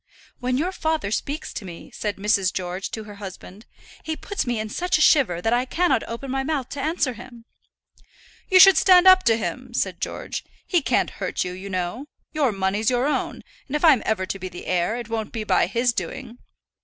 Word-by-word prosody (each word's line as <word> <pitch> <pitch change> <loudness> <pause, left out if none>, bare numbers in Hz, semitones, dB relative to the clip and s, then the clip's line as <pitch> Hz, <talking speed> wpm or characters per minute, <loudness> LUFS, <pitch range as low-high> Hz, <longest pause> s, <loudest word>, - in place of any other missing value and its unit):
"When 250 0 -1
your 340 +6 0
father 315 - -2
speaks 285 +6 -3
to - - -6
me," 175 -3 -10
said 210 -2 -3
Mrs. 195 -2 +2
George 185 +1 -4
to 220 - -6
her 205 -1 -11
husband, 195 +2 -10 0.4
"he 315 - -3
puts 405 -9 -4
me 240 -2 -1
in 215 - -3
such 360 +10 0
a - - -4
shiver 225 - +4
that 225 - +2
I 245 +1 +2
cannot 345 -2 +1
open 245 +3 -6
my 270 0 0
mouth 275 -2 -2
to 280 - -5
answer 300 -3 0
him." 235 0 -13 1.0
"You 370 - +6
should 385 -2 +9
stand 365 +1 +6
up 370 0 +8
to 225 -1 +4
him," - - -5
said - - -1
George. - - -4 0.2
"He 350 -3 +2
can't - - +1
hurt - - -1
you, 180 - -4
you 185 +2 -8
know. 185 +9 -3 0.3
Your 290 -6 +2
money's 195 +2 0
your 250 +1 +1
own; 295 - -2 0.2
and 280 - -4
if 300 - +2
I'm 290 -7 +6
ever 215 -4 0
to 195 - -5
be 185 0 -5
the 175 - -10
heir, 180 +4 0
it 240 -2 -6
won't 225 -2 -3
be 225 -2 -4
by - - +2
his 240 0 +1
doing." 245 0 -6
235 Hz, 215 wpm, -23 LUFS, 200-295 Hz, 1.0 s, should